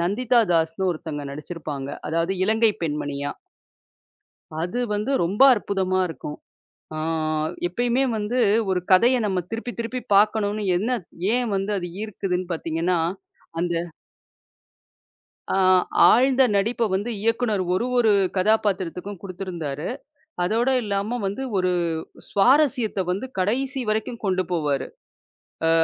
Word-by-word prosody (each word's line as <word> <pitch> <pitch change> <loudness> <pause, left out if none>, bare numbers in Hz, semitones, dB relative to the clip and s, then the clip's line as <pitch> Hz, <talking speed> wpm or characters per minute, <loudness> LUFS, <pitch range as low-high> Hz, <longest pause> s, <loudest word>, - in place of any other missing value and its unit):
நந்திதா 235 +7 +2
தாஸ்ன்னு 165 +3 +1
ஒருத்தங்க 155 -3 -5
நடிச்சு 150 +4 -7
இருப்பாங்க. 145 -4 -5 0.2
அதாவது 165 +3 0
இலங்கை 220 +2 +4
பெண்மணியா. 145 -2 -3 1.3
அது 180 +8 -3 0.2
வந்து 210 +5 -2
ரொம்ப 200 +9 +1
அற்புதமா 190 -3 -1
இருக்கும். 150 -2 -7 0.6
ஆ - - -4 0.7
எப்பையுமே 245 +7 0
வந்து 215 +4 -1 0.3
ஒரு 185 -1 +1
கதைய 235 +8 +6
நம்ம 190 -3 0
திருப்பி 230 +2 -4
திருப்பிப் 235 0 -5
பாக்கணும்ன்னு 210 0 +2
என்ன 235 +5 0 0.3
ஏன் 245 -1 +1
வந்து 195 +2 -1
அது 175 -1 -4
ஈர்க்குதுன்னு 185 -4 -3
பாத்தீங்கன்னா, 165 +2 -1 0.6
அந்த 175 0 0 1.8
ஆ - - +2 0.5
ஆழ்ந்த 265 +2 +5
நடிப்ப 230 +4 +1
வந்து 205 +5 -1
இயக்குனர் 225 -2 +1
ஒரு 235 - 0
ஒரு 230 -3 +4 0.3
கதாபாத்திரத்துக்கும் 195 -2 0
குடுத்து 195 -1 -6
இருந்தாரு. 155 -4 -4 0.6
அதோட 230 +7 +1
இல்லாம 205 +3 -1
வந்து 200 +7 -3
ஒரு 185 -1 +1 0.6
சுவாரஸ்யத்த 245 -2 +3
வந்து 195 +8 -2
கடைசி 260 +8 0
வரைக்கும் 220 +2 -2
கொண்டு 185 -1 +1
போவாரு. 145 -6 0 0.8
அ - - +4
200 Hz, 115 wpm, -23 LUFS, 175-230 Hz, 1.8 s, கதைய